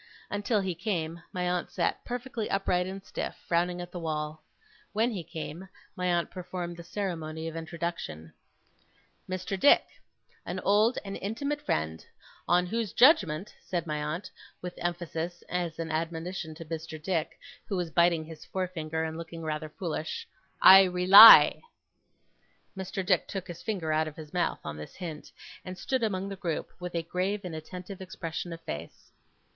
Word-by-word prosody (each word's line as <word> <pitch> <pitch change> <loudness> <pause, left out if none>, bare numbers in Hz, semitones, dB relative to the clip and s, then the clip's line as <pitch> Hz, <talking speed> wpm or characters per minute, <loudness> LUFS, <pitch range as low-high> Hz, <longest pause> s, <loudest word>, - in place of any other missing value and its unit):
Until 205 +1 +1
he 190 -2 -1
came, 170 -3 -3
my 180 -1 -2
aunt 180 -1 -1
sat - - -1
perfectly 245 -2 -4
upright 180 -2 +1
and 195 +1 -7
stiff, - - -4
frowning 175 +1 +1
at 175 - -8
the 175 - -5
wall. 155 -1 -3 0.5
When 225 +4 +2
he 190 -6 -4
came, 165 +2 -7 0.3
my 180 -2 -1
aunt 175 -2 +1
performed 180 -1 -5
the 170 - -8
ceremony 165 -4 -4
of 165 - -6
introduction. 165 - -5 1.0
'Mr. 185 +1 -3
Dick. 285 - +6 0.6
An - - -4
old 215 +5 +3
and 195 0 -5
intimate 280 +9 -3
friend. 80 - -2 0.4
On 180 +1 +4
whose 220 -1 -2
judgement,' 205 - +4
said 175 -2 -3
my 150 -2 -2
aunt, 165 +6 -4 0.3
with 180 0 -6
emphasis, 175 0 -3
as 175 -3 -2
an 165 -1 -4
admonition 165 +1 -3
to 165 - -9
Mr. 160 0 -6
Dick, 165 0 -2 0.3
who 200 - -2
was 175 -2 -2
biting 170 -1 +3
his 160 -1 -10
forefinger 160 -4 -3
and 160 0 -4
looking 165 0 -7
rather 155 0 -3
foolish, 170 - -4 0.4
'I 190 +1 +11
rely.' 185 +4 +10 1.1
Mr. 190 0 -4
Dick 180 -2 +2
took 195 -3 -5
his 175 -1 -8
finger 175 -8 -2
out 155 0 +2
of 150 - -7
his 155 -2 -10
mouth, 180 -1 0
on 75 0 -5
this 75 - -9
hint, 165 -5 -7 0.3
and 185 0 -7
stood 260 +7 -1
among 195 -4 -1
the 200 - -5
group, 175 -4 -3
with 180 -1 -6
a 165 - 0
grave 185 +4 -1
and 175 - -5
attentive 180 +4 -8
expression 175 -2 -5
of 165 - -6
face. 75 - -8
175 Hz, 165 wpm, -29 LUFS, 160-190 Hz, 1.1 s, I